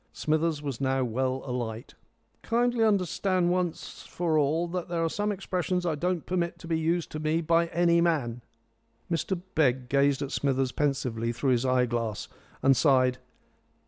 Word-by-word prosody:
Smithers 155 -1 0
was 140 -3 -4
now 135 0 +1
well 130 +2 -1
alight. 120 -3 -4 0.5
"Kindly 240 0 +1
understand 185 -3 +1
once 180 -2 -3
for 170 -2 -2
all 155 +3 +2
that 180 0 -3
there 170 -1 -1
are - - 0
some 205 +1 -1
expressions 185 -2 -2
I 165 - +1
don't 175 +2 -2
permit 170 -1 -1
to 170 - -11
be 165 -1 0
used 165 +1 -1
to 155 - -5
me 155 +1 +1
by 170 +1 +2
any 170 0 +3
man." 135 -9 0 0.7
Mr 170 +2 -1
Begg 130 -4 +1
gazed 140 0 +2
at 140 - -5
Smithers 135 -2 0
pensively 130 -6 -1
through 130 +3 0
his 125 +1 +1
eye 130 -1 +3
glass 115 -3 -3 0.4
and 135 0 +5
sighed. 130 -1 +3
155 Hz, 165 wpm, -28 LUFS, 130-175 Hz, 0.7 s, and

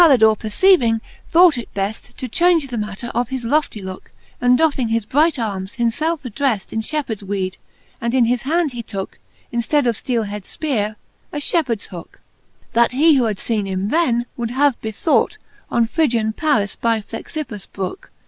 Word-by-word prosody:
Which 340 - +9
Caltdore 220 0 +6
perceiving, 230 - +3 0.3
thought 340 -5 +6
it 235 - -8
bell 200 +2 0
To 255 - -8
chaunge 330 +2 +3
die 245 - -4
manner 210 +2 -4
of 240 0 0
his 260 -3 -3
loftie 240 -5 0
looke; 190 0 -8 0.3
And 245 0 +5
doffing 280 -6 +2
his 225 -1 0
bright 300 +7 +3
armes, 200 -5 -3
himfelfe 290 +8 0
addreft 250 -4 -1
In 220 - 0
fliepheards 245 -5 -3
weed; 195 -2 -3 0.4
and 235 +2 0
in 250 -3 +5
his 240 +1 +1
hand 315 +2 +1
he 240 -1 -5
tooke, 195 -4 -6 0.3
In 235 - 0
ftead 290 +4 +1
of 235 -2 +2
fteelehead 215 -4 -2
fpeare, 215 -3 -2 0.4
a - - -4
fliepheards 285 - 0
hooke; 175 -3 -10 0.5
That 235 +1 +3
who 280 -2 +5
had 215 -3 -1
feene 210 -2 -1
him 190 +2 -2
then^ 250 -8 +2
would 235 -2 -2
have 270 +1 +2
bethought 220 - +1 0.3
On 235 -1 +2
Phrygian 230 -5 +1
Paris 215 -9 +1
by 230 -2 +1
Pkxippus 225 - -6
brooke. 195 - -5
235 Hz, 175 wpm, -20 LUFS, 215-290 Hz, 0.5 s, Which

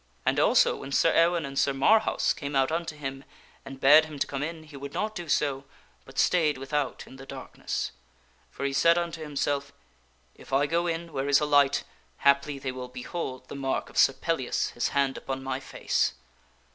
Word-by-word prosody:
And - - +2
also, - - +4
when 135 - -8
Sir 165 +4 +3
Ewaine 170 -1 +3
and 140 0 -3
Sir 140 - +2
Marhaus 215 +12 +3
came 140 -1 -5
out 135 +2 +2
unto 165 -1 -2
him 135 -2 -6 0.4
and 135 -1 -10
bade 150 +4 +7
him 155 -2 -9
to - - 0
come 140 -1 -5
in, 160 +1 -4
he 150 -2 -14
would 140 0 -8
not 215 0 -1
do 175 -6 -7
so, 140 -2 0 0.4
but 135 0 -15
stayed 155 -6 +3
without 135 +1 -3
in 130 - -13
the 135 - -11
darkness; - - -5 0.6
for 140 - -5
he 140 - -1
said 170 +4 +4
unto 170 -2 -3
himself, 145 -1 -2 0.3
" 65 0 -37
If - - -13
I 140 +2 +4
go 170 +4 0
in 165 -1 -3
where 135 0 -2
is 140 - +6
a 150 - 0
light, 145 -1 +3 0.3
haply 140 +1 +2
they 135 -1 -4
will 125 0 -7
behold 130 +1 -6
the - - -8
mark 135 -1 -2
of - - -11
Sir 135 - +6
Pellias 150 -4 -1
his 120 - -1
hand 140 -1 0
upon 135 0 -5
my 135 0 -2
face." 130 - -1
140 Hz, 205 wpm, -27 LUFS, 135-160 Hz, 0.6 s, bade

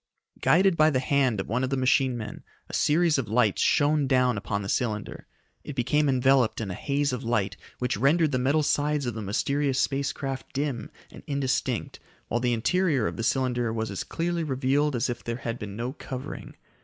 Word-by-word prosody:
Guided 190 +1 +4
by 155 -1 +5
the 140 - +1
hand 130 -4 +1
of 95 - -3
one 125 +4 -1
of 130 - 0
the 135 - -1
machine 130 0 +2
men, 110 -2 -7 0.3
a - - -13
series 160 -1 +3
of 125 - -3
lights 110 -2 +2
shone 145 -1 +3
down 125 -2 +3
upon 100 0 -3
the - - -5
cylinder. 105 -2 -2 0.4
It 145 - -7
became 140 +4 +2
enveloped 130 -2 +3
in 105 -4 -3
a - - -3
haze 140 +6 -1
of 125 - -4
light 110 -4 0 0.2
which 125 -5 -1
rendered 150 - +3
the 130 - 0
metal 140 +5 +2
sides 150 -1 +1
of 120 - -2
the 110 - -5
mysterious 135 +6 0
space 140 0 0
craft 135 -1 -6
dim 135 -5 -2 0.2
and - - -11
indistinct 140 -2 -1 0.3
while 120 - 0
the 120 0 +1
interior 145 - +1
of - - -2
the - - -4
cylinder 120 -1 0
was 110 -1 -3
as 100 - -3
clearly 170 0 -2
revealed 140 0 +1
as 120 +2 0
if 120 -1 -4
there 115 - -3
had 120 -1 -5
been 100 -1 -6
no 120 +4 -3
covering. 135 0 -7
130 Hz, 205 wpm, -26 LUFS, 115-145 Hz, 0.4 s, by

